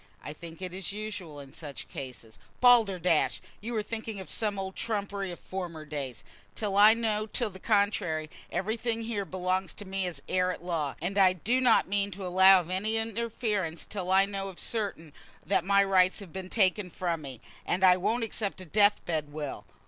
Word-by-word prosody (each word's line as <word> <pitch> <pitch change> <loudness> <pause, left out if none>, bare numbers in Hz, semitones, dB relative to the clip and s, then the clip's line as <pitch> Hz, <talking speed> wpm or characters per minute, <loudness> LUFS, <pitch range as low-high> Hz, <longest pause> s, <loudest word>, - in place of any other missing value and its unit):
I 150 - -6
think 165 +2 -10
it 180 -1 -4
is 190 +1 -3
usual 205 -7 -6
in 140 -1 -12
such 150 -3 -8
cases." 125 -4 -9 0.2
"Balderdash! 195 -10 +4 0.2
You 235 +3 -5
are 215 - 0
thinking 220 -1 -5
of 190 - -7
some 210 -3 0
old 190 0 -4
trumpery 200 -3 -2
of 175 - -8
former 175 -5 -6
days. 140 -6 -5 0.3
Till 205 -2 -2
I 210 +2 +8
know 215 -2 -1
to 230 +1 -1
the 190 -1 -12
contrary, 200 -7 +1 0.2
everything 225 +3 -1
here 215 -3 -2
belongs 185 +1 -2
to 205 - -8
me 190 -1 -2
as 165 -5 -5
heir 185 0 +1
at 180 - -7
law, 160 -6 -2
and 195 +5 -1
I 185 -1 +6
do 235 +9 0
not 245 -3 +4
mean 200 +1 +1
to 195 - -5
allow 190 +1 +7
of 175 +1 -9
any 215 +4 +1
interference 225 -6 -2
till 190 -4 -5
I 190 +1 +5
know 195 -1 -4
for - - -22
certain 200 -9 -3 0.3
that 195 - +2
my 200 +1 +4
rights 185 -1 +3
have 195 -6 -10
been 190 -1 -6
taken 195 -2 +2
from 170 -2 -2
me. 135 -5 -8 0.2
And 185 +2 -1
I 180 -1 +8
won't 225 +6 0
accept 210 -3 -3
a 185 - -7
death 205 +4 +3
bed 155 -3 -2
will. 150 -2 -5
190 Hz, 195 wpm, -29 LUFS, 175-210 Hz, 0.3 s, I